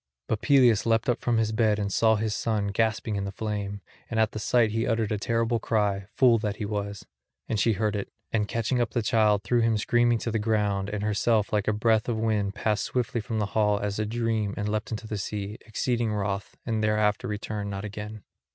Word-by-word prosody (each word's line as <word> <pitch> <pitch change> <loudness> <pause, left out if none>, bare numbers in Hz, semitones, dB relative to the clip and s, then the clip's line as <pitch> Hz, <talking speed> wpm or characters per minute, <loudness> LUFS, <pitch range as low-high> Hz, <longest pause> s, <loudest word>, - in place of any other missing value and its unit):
But 110 - -1
Peleus 125 -7 +4
leapt 115 0 +2
up 120 - +1
from 120 -1 +1
his 110 -1 +1
bed 110 -2 +2
and 100 -2 -2
saw 110 -1 +4
his 110 0 -1
dear - - -3
son 110 -3 0
gasping 110 0 0
in 100 - -2
the 100 - -4
flame; 100 -1 -4 0.3
and 115 - -1
at 110 -1 +3
the - - -5
sight 115 0 +2
he 115 +1 -1
uttered 110 -2 0
a 105 - 0
terrible 115 +1 0
cry, 100 -4 0
fool 120 -3 +5
that 105 -2 -2
he 105 - -4
was; 100 -1 -4 0.4
and 110 - -1
she 115 +3 +3
heard 105 +1 0
it, 100 - -3 0.2
and 105 -2 +1
catching 115 +3 0
up 120 - -1
the 120 - 0
child 105 -2 +3
threw 120 0 +2
him 115 -1 +2
screaming 120 +2 +2
to 115 - -3
the 110 - 0
ground, 105 -2 0
and 105 0 -3
herself 105 +1 +1
like 105 -1 +1
a - - +4
breath 110 +1 +2
of 115 - 0
wind 105 -3 0
passed 105 -2 0
swiftly 120 -2 -1
from 115 0 -4
the 105 - +1
hall 105 -2 +3
as 100 0 -3
a 110 - 0
dream 110 -2 -1
and 105 - -2
leapt 105 0 -2
into 110 -1 -5
the 110 -1 -4
sea, 105 +2 -4
exceeding 115 0 0
wroth, 100 -1 -3
and 110 -2 -1
thereafter 105 -1 +1
returned 105 -1 -4
not 100 +1 -4
again. 105 +1 -7
110 Hz, 230 wpm, -27 LUFS, 105-115 Hz, 0.4 s, fool